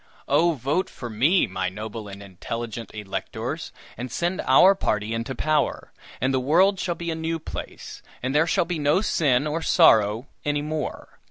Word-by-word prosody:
"Oh, 170 +1 +3
vote 145 +7 -1
for 120 -2 -8
me, 145 - +3
my 95 0 -2
noble 105 +2 -7
and 100 0 -9
intelligent 115 +4 -6
electors, 105 -2 -5 0.2
and 120 +1 -6
send 175 +6 -1
our 180 +9 +7
party 105 - -1
into 115 +4 -3
power, 155 -1 0 0.3
and 130 +1 +1
the 130 - +2
world 180 +9 +3
shall 175 -2 -1
be 170 0 -4
a - - -2
new 165 +1 -2
place, 160 - -8 0.2
and 130 +1 -1
there 155 +3 +3
shall 170 - +2
be 170 -2 -3
no 150 +6 +2
sin 145 - +2
or 155 +2 -2
sorrow 110 - +4 0.2
any 145 0 -1
more! 155 0 -5
140 Hz, 175 wpm, -24 LUFS, 115-165 Hz, 0.3 s, our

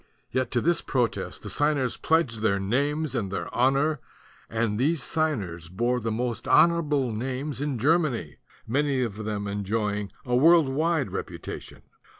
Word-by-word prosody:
Yet 130 -1 0
to 120 - +2
this 170 +1 +2
protest 125 -3 -2
the - - -6
signers 145 -4 +1
pledged 140 -9 +1
their 100 -3 +2
names 140 +8 0
and 100 -7 -2
their 100 - -4
honor; 135 +4 +2 0.5
and 115 -2 -1
these 145 +1 +1
signers 105 - -2
bore 120 +7 0
the 115 -1 -2
most 120 +1 -3
honorable 150 -7 +3
names 130 +5 -3
in 145 -3 -1
Germany, 135 - +1 0.3
many 140 +1 +1
of 110 -2 -4
them 105 -1 -3
enjoying 100 0 -2
a 125 -1 +1
world 160 +2 +6
wide 155 +1 0
reputation. - - -7
125 Hz, 150 wpm, -26 LUFS, 110-150 Hz, 0.5 s, world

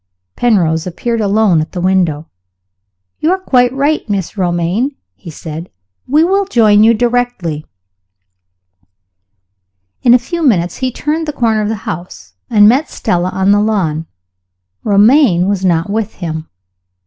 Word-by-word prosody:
Penrose 170 -8 +1
appeared 230 +6 -3
alone 205 -5 +2
at 155 - -6
the 180 - -4
window. 175 -4 0 0.9
"You 315 - +1
are 375 - +2
quite 250 -10 +2
right, 285 +4 0
Mrs. 200 -3 -3
Romayne," 180 +8 -1 0.2
he 175 - -12
said; 160 +2 -8 0.4
"we 300 +4 +3
will 390 +3 +1
join 215 - +4
you 230 +1 +5
directly." 240 -10 -2 2.3
In 245 -1 +5
a - - +7
few 335 +8 -5
minutes 180 - +1
he 260 -1 -2
turned 310 +5 -3
the - - -1
corner 225 -5 0
of 210 - -2
the 225 - -1
house, 180 -4 -7 0.2
and 210 -3 +5
met 270 +7 +2
Stella 180 +1 -1
on 190 +1 +1
the 205 0 +3
lawn. 170 -7 -1 0.8
Romayne 205 - +4
was 200 -2 -1
not 170 -3 +1
with 220 0 -3
him. 160 -3 -6
210 Hz, 145 wpm, -14 LUFS, 175-245 Hz, 2.3 s, a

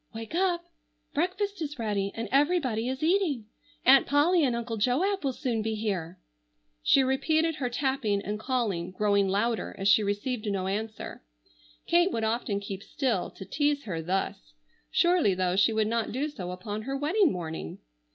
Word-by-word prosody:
Wake 225 +5 -7
up. 350 -1 +1 0.5
Breakfast 375 +4 -1
is 295 -2 -4
ready 205 -4 -1
and 230 - -3
everybody 275 -6 +2
is 265 +3 -4
eating. 325 - +1 0.4
Aunt 270 +1 +7
Polly 315 +4 +4
and 250 -4 +2
Uncle 235 -1 -3
Joab 305 - +1
will 270 - +1
soon 245 -3 -2
be 220 0 -2
here." 190 -5 -3 0.6
She 270 - +5
repeated 315 +5 +1
her 250 -3 -1
tapping 255 -5 0
and 210 +1 -4
calling, 220 -8 -1
growing 200 +1 +2
louder 220 +4 0
as 195 - -1
she 205 +2 +6
received 210 +3 -2
no 195 -2 -1
answer. 215 +3 -4 0.6
Kate 345 +2 +3
would 225 - -2
often 220 -2 0
keep 200 -1 -6
still 230 -4 -1
to 190 - -10
tease 290 +7 0
her 170 -6 -4
thus. 160 - -3 0.4
Surely 345 - +3
though 180 -1 0
she 200 +4 +4
would 220 -1 +1
not 230 0 -1
do 275 +6 -1
so 185 -12 -6
upon 205 +4 -5
her 270 +4 -3
wedding 325 +5 +3
morning! 160 - -5
230 Hz, 170 wpm, -28 LUFS, 200-290 Hz, 0.6 s, Aunt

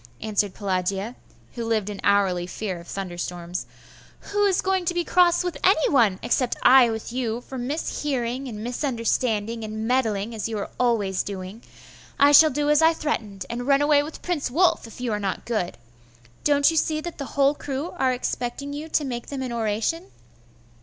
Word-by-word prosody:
answered 205 -2 -1
Pelagia, 195 +3 -2 0.4
who 235 - -4
lived 225 -3 0
in 205 -2 -6
hourly 190 -3 +2
fear 185 -2 -4
of 170 - -13
thunderstorms. 175 -2 -5 0.6
'Who 410 0 +2
is 385 -2 +2
going 380 -1 0
to 350 - -1
be 350 - +1
cross 350 0 +3
with 355 -2 -4
any 370 -5 +4
one, 225 -9 +3
except 255 -2 +1
I 255 -2 +7
with 225 +1 -5
you, 240 -2 -2
for 260 +1 -8
mishearing 265 -1 -2
and 215 -2 -7
misunderstanding, 230 -3 -1
and 220 +1 -4
meddling, 230 -4 0
as 225 0 -3
you 220 - -3
are 200 - -5
always 215 -6 +1
doing? 195 +2 -7 0.6
I 285 +1 +7
shall 310 +2 +8
do 290 +1 -1
as 300 +1 +4
I 325 +1 +5
threatened, 215 - -3
and 245 +2 -5
run 280 0 +4
away 290 -1 +4
with 305 +2 -8
Prince 345 -7 -1
Wulf, 335 -2 +2
if 225 - -13
you 245 -2 -2
are 210 - -1
not 195 -2 -3
good. 215 -7 -2 0.7
Don't 285 +1 +4
you 325 - -2
see 310 0 +1
that 345 0 -7
the 280 0 -7
whole 280 0 +5
crew 290 +2 -4
are 265 -7 +1
expecting 250 +2 -3
you 300 +2 -6
to 300 - +1
make 240 -3 -5
them 275 -2 -4
an 255 - -4
oration? 230 - -1
245 Hz, 185 wpm, -24 LUFS, 210-290 Hz, 0.7 s, shall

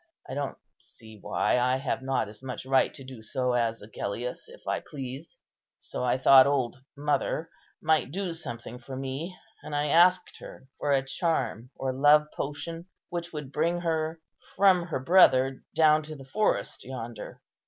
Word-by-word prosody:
I - - -6
don't 140 0 -3 0.2
see 110 -1 -14
why - - +1
I 125 +1 +2
have 130 0 -2
not 130 -4 0
as 105 +2 -11
much 130 -1 -6
right 135 0 +3
to 135 - -9
do 130 -3 -10
so 125 +2 -1
as 115 -3 0
Agellius, 110 +3 -5
if - - -14
I - - 0
please. 135 +2 -8 0.4
So - - -6
I 125 - +2
thought 130 0 +8
old 130 -4 0 0.2
mother 150 +2 -1 0.3
might 155 -5 +2
do 185 0 -3
something 125 -6 -7
for 130 +2 -8
me; 135 +7 -5 0.2
and 150 - -6
I 145 0 0
asked 180 +4 +4
her - - -11
for 145 - 0
a 135 -1 +2
charm 135 -5 -1
or 130 -1 -2
love 145 +3 +5
potion, 165 +4 -5 0.2
which 175 -1 -4
would 150 -4 -6
bring 170 +4 0
her 160 -1 -1 0.4
from 185 -3 +4
her 165 - -2
brother 135 -4 +5
down 155 -1 +5
to 155 0 -8
the 135 -2 -11
forest 210 +10 0
yonder. 120 -4 -7
135 Hz, 170 wpm, -28 LUFS, 130-160 Hz, 0.4 s, thought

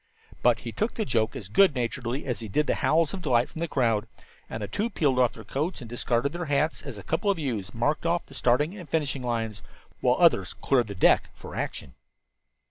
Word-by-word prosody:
But - - +3
he - - -5
took 220 +2 -2
the 220 - -1
joke 110 - 0
as 95 - -6
good 165 - +4
naturedly 125 +2 -2
as 125 -3 -2
he 115 - -6
did 150 +10 +1
the - - +1
howls 160 +1 +2
of 195 - -4
delight 125 -6 +2
from - - -8
the 170 - -1
crowd, 115 -7 +1 0.4
and 110 - -5
the - - -3
two 210 - -1
peeled 140 - +1
off 125 -2 +3
their 110 - -11
coats 145 - -2
and 120 - -8
discarded 120 +3 0
their 175 0 -3
hats 150 +2 0
as 135 -7 -8
a 100 - -9
couple 165 +6 0
of 200 - +2
youths 120 - -3
marked 145 +8 0
off 170 +1 +1
the - - -15
starting 140 +8 +2
and 180 -7 -10
finishing 145 -4 0
line, 115 -3 -1 0.5
while - - +3
others - - +4
"cleared 125 -4 +1
the 100 - -6
deck 90 - +4
for - - -10
action." 65 - -4
130 Hz, 225 wpm, -27 LUFS, 115-160 Hz, 0.5 s, good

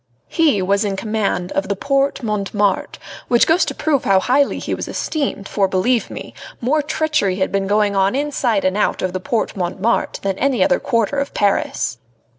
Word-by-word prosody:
He 300 - +2
was 200 +3 +2
in 200 -2 -1
command 200 -4 -2
of 195 +1 -2
the 200 - 0
Porte 275 +4 0
Montmartre, 205 -2 -1 0.3
which 240 -1 +4
goes 325 +3 +3
to - - -4
prove 295 -4 0
how 195 -1 +4
highly 275 +7 +2
he - - -4
was - - -4
esteemed, 275 -10 -3
for, 195 -2 +1
believe 225 +6 +1
me, - - -8 0.3
more 290 +6 +1
treachery 300 -10 0
had 190 0 -1
been 195 -1 0
going 205 0 +2
on 195 +3 +2
inside 265 -8 0
and 185 0 +1
out 210 - 0
of 185 -1 -1
the 185 - -2
Porte 220 +4 -2
Montmartre 190 +5 -1
than 195 -1 -1
in - - -3
any 275 -3 +3
other 285 -1 +2
quarter 230 +3 0
of 280 - -4
Paris. 195 - 0
210 Hz, 195 wpm, -19 LUFS, 195-275 Hz, 0.3 s, which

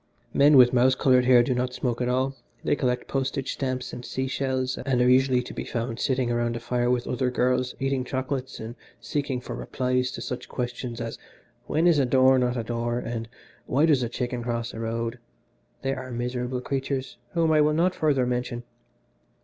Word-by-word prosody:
Men 145 +1 +6
with 125 -1 +7
mouse 130 +1 +4
coloured 130 -1 +4
hair 125 -1 +6
do 130 - 0
not 125 0 -2
smoke 120 -2 -2
at 125 - 0
all. 130 +2 0 0.3
They - - +2
collect 125 -3 -1
postage 135 0 -2
stamps 130 -2 -3
and 120 - -7
sea 130 +2 -3
shells, 130 -1 -1
and 130 -1 0
are 125 - +4
usually 130 0 +4
to - - -8
be - - -4
found 115 -1 -3
sitting 130 -2 0
round 120 0 0
a - - -3
fire 120 +1 0
with 125 -1 +1
other 125 0 0
girls 125 0 0
eating 135 -1 0
chocolates 130 0 -3
and 110 +1 -6 0.3
seeking 140 -3 -2
for - - -6
replies 125 0 -1
to - - -6
such 125 - -5
questions 120 -1 -4
as, 115 -1 -5 0.5
when 160 +2 +1
is 170 -4 +5
a 135 - +2
door 130 +1 +5
not 125 0 0
a 115 - -1
door? 120 +1 -2
and 115 -1 -4 0.4
why 140 +5 +3
does 150 -5 +4
a 120 - -1
chicken 125 0 -3
cross 115 -1 -3
the - - -8
road? 115 +1 -3 0.6
They 135 - 0
are 130 -1 -6
miserable 125 +1 -3
creatures 135 0 -3 0.2
whom 165 -2 +2
I 155 -1 +5
will 150 0 +3
not 175 +4 +2
further 145 -7 +2
mention. 125 -1 -2
125 Hz, 200 wpm, -26 LUFS, 120-135 Hz, 0.6 s, with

